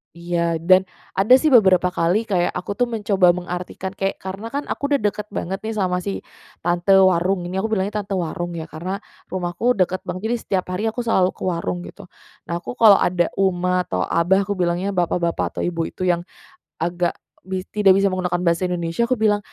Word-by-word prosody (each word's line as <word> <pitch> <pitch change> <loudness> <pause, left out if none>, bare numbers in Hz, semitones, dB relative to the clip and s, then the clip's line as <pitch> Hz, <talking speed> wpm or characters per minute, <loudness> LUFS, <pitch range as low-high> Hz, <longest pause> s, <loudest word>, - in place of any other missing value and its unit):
Iya, 170 -1 -1
dan 185 +3 +5 0.3
ada 230 +7 +6
sih 315 - +1
beberapa 190 - +5
kali, 180 +6 0
kayak 180 -5 +1
aku 180 +3 -5
tuh 245 - +1
mencoba 205 -6 +3
mengartikan, 180 +2 -5
kayak, 195 0 -2
karena 195 +4 -6
kan 285 +1 -3
aku 285 0 -3
udah 285 - +3
deket 210 0 -5
banget 195 0 -4
nih 220 - -3
sama 185 -4 -1
si 200 +1 -3 0.4
tante 175 +2 0
warung, 180 0 +2
ini 185 - -5
aku 210 +3 -1
bilangnya 205 0 -1
"tante 200 - -15
warung" 175 +1 -3
ya, 160 - -6
karena 175 +6 -5 0.3
rumahku 180 +6 0
deket 185 -4 0
banget, 185 - -5
jadi 240 - 0
setiap 190 -2 -1
hari 180 +3 -3
aku 245 - -7
selalu 190 -6 +2
ke - - -11
warung 165 - -2
gitu. - - -13 0.3
Nah 170 0 -3
aku 210 - -7
kalau 215 -5 +7
ada 175 -1 +1
uma 180 -1 +1
atau 90 0 -1
abah, 180 - +2
aku 205 - -5
bilangnya 175 +3 0
bapak-bapak 175 -2 -1
atau - - -3
ibu 170 -2 -1
itu - - -7
yang 175 -1 0 0.5
agak 175 +1 -1 0.3
bis 185 -1 -3
tidak 200 -3 +5
bisa 195 0 +2
menggunakan 180 -1 -1
bahasa 170 +1 +1
Indonesia, 175 +5 -1
aku 255 - +2
bilang, 215 -2 +2
185 Hz, 195 wpm, -21 LUFS, 175-200 Hz, 0.5 s, kalau